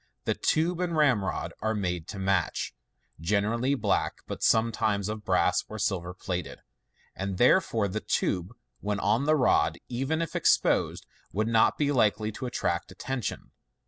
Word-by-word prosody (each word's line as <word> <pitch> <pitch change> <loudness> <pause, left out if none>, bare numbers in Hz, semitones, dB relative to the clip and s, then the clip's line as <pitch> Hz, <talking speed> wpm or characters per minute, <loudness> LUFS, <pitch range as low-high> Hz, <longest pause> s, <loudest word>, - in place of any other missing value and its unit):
The - - +2
tube 170 +2 +1
and 175 -3 -1
ramrod 125 -10 +1
are 110 +1 0
made 90 -5 -2
to 110 - -7
match 95 -3 0 0.5
(generally 105 - +1
black, - - 0
but - - -6
sometimes 110 -3 +2
of 110 0 -5
brass - - +2
or - - -6
silver 90 -1 -2
plated); 90 -1 -5 0.5
and 95 -1 -3
therefore 120 - +3
the 105 +3 -3
tube, 90 +1 -1 0.3
when 105 0 -2
on 110 +8 +1
the 155 +1 +4
rod, 130 -5 +3
even 135 +6 -1
if 165 - -7
exposed, - - +2 0.3
would 110 +3 0
not 115 -1 +3
be 145 -1 +1
likely 110 -4 +2
to 125 +4 -5
attract 85 -7 -2
attention. 125 +5 -4
110 Hz, 150 wpm, -28 LUFS, 95-130 Hz, 0.5 s, the